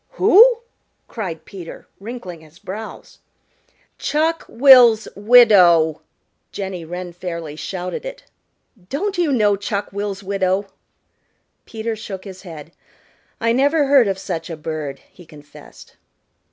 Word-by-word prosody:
"Who?" 460 +2 +5 0.5
cried 185 -8 -6
Peter, 180 -4 -11
wrinkling 195 -6 -8
his 160 +1 -19
brows. 210 +5 -9 0.8
"Chuck 315 +3 -1
will's 240 -4 +6
widow," 195 -8 +5 0.5
Jenny 190 -3 -6
Wren 175 +2 -7
fairly 170 -4 -7
shouted 180 - -6
it. - - -8 0.7
"Don't 385 +7 -3
you 335 -4 +1
know 210 -6 +2
Chuck 205 0 -4
will's 200 -1 -4
widow?" 195 0 -1 1.0
Peter 225 0 -4
shook 195 -3 -8
his 190 -2 -11
head. 165 -4 -11 0.7
"I 230 - +1
never 285 +4 +2
heard 270 -5 +4
of 195 -1 -1
such 180 -3 -5
a 165 - -6
bird," 150 -2 -6
he 180 - -16
confessed. 150 -2 -16
200 Hz, 120 wpm, -19 LUFS, 175-245 Hz, 1.0 s, will's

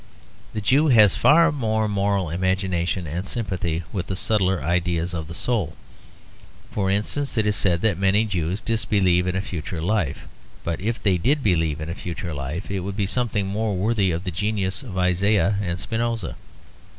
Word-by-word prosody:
The 105 - -3
Jew 135 +9 +3
has 110 -8 +6
far 165 +2 +5
more 110 -6 0
moral 100 -4 0
imagination 95 0 0
and 85 +6 -4
sympathy 95 -8 -2
with 95 -3 -3
the 95 - -2
subtler 95 -5 +1
ideals 85 +1 0
of 80 -3 -4
the 85 - -7
soul. 100 -11 -1 1.0
For 95 -2 0
instance, 110 +8 -1
it 110 - +2
is 105 -1 +2
said 90 -3 +1
that 100 -5 +1
many 100 +3 +3
Jews 95 0 -2
disbelieve 100 -6 +2
in 90 - -1
a 95 - +1
future 85 -3 -5
life; 90 -3 -1 0.4
but 85 +1 -3
if 115 +4 -1
they 95 -4 +3
did 140 - +1
believe 80 -6 +1
in 80 - -5
a 85 - -3
future 85 -2 -5
life, 75 +7 -5
it 100 - -1
would 95 +2 -5
be 100 - +1
something 105 -1 0
more 105 +1 -1
worthy 100 0 +1
of 85 +1 -2
the 95 - -3
genius 100 - -1
of 110 -9 -7
Isaiah 100 +2 +2
and 85 -2 -2
Spinoza. 115 -4 -2
95 Hz, 180 wpm, -23 LUFS, 85-110 Hz, 1.0 s, has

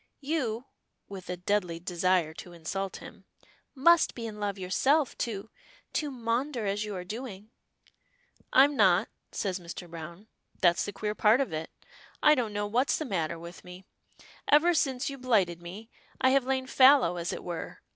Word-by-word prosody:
You," 265 -6 -2 0.4
with 190 -2 -9
a 180 - -3
deadly 180 -2 -1
desire 175 -2 +1
to 175 +1 -10
insult 190 +4 -4
him, - - -13 0.5
"must 340 +5 +4
be 235 - -5
in 215 -2 -7
love 205 -1 -2
yourself 265 +10 +1
to 220 -1 -4 0.4
to 300 - -1
maunder 240 0 -2
as 200 +1 -1
you 210 -1 -5
are 180 - -5
doing?" 215 +1 -7 1.0
"I'm 280 +2 +6
not," 190 -6 +4 0.2
says 190 -2 -2
Mr. 175 +1 -8
Browne, 170 +4 -9 0.3
"that's 175 -2 +3
the - - -4
queer 210 0 -3
part 215 +3 +4
of 265 -12 -1
it. 155 +1 -4 0.5
I 300 - +8
don't 245 -7 0
know 205 0 -2
what's 240 +6 +1
the 310 - -3
matter 170 - -2
with 170 +1 -10
me. 180 +1 -12 0.6
Ever 305 +4 +5
since 265 -5 0
you 275 -1 -5
blighted 195 -9 +1
me, 190 +6 -9 0.3
I 260 - +4
have 270 -1 +3
lain 260 0 0
fallow, 260 -9 +5
as 170 0 -2
it - - -6
were. 175 -2 -6
210 Hz, 170 wpm, -29 LUFS, 180-260 Hz, 1.0 s, I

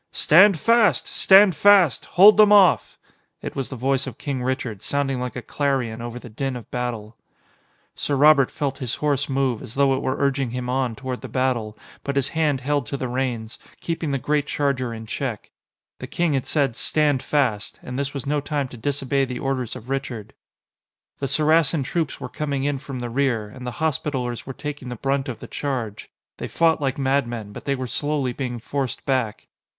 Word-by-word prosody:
"Stand 190 +4 +6
fast! 230 +1 +3
Stand 195 0 +6
fast! 190 -4 +5
Hold 205 +4 +9
them 210 -1 +7
off!" 200 -3 +5 0.5
It - - -5
was 135 -2 -3
the 130 - -6
voice 135 +2 0
of - - -7
King 135 -3 -3
Richard, 125 -5 -3
sounding 135 -2 -1
like 125 -2 -4
a 125 - -5
clarion 130 -6 -1
over 120 0 -6
the 125 - -10
din 130 +4 -3
of 120 - -10
battle. 115 -3 -4 0.8
Sir 145 - -2
Robert 140 -1 +5
felt 140 -2 -3
his 125 -3 -3
horse 145 -2 -1
move, 135 -4 0
as 110 - -9
though 140 -1 +3
it 130 - -3
were 130 - -1
urging 140 -2 0
him 125 +1 -4
on 130 -3 -1
toward 130 -1 -5
the - - -7
battle, 125 -5 -1 0.3
but 140 - -3
his 140 -2 +1
hand 150 -5 0
held 140 -2 -1
to 140 - -3
the 130 - -3
reins, 120 -3 -3 0.2
keeping 165 -2 -3
the 140 - 0
great 145 +2 0
charger 140 -5 -1
in 110 -1 -7
check. 115 -1 -5 0.5
The - - -7
King 170 -3 0
had 135 -2 -1
said 140 -6 +1
"Stand 145 0 +1
fast!" 125 -8 -1
and 125 +1 -5
this 140 0 -2
was 140 -2 -6
no 145 +1 0
time 145 -2 -2
to 125 - -11
disobey 140 +2 0
the 125 -1 -5
orders 130 -3 -2
of 125 -1 -10
Richard. 130 -6 -4 0.9
The 140 - -1
Saracen 155 +1 +2
troops 160 +2 -2
were - - -5
coming 140 -3 -3
in 145 -1 -1
from 135 -1 -7
the 120 - -4
rear, 125 -5 0
and 125 +3 -9
the 125 - -6
Hospitallers 130 -6 -2
were 135 - -5
taking 140 -2 -6
the 125 - -5
brunt 135 +2 -1
of 120 - -5
the - - -10
charge. 125 -8 -4 0.3
They - - -5
fought 165 -2 +2
like 135 -2 -1
madmen, 120 -6 -1
but - - -10
they 140 - 0
were 130 -1 -4
slowly 140 0 -1
being 125 -2 -4
forced 130 +1 -4
back. 125 -6 -1
135 Hz, 200 wpm, -23 LUFS, 125-145 Hz, 0.9 s, Hold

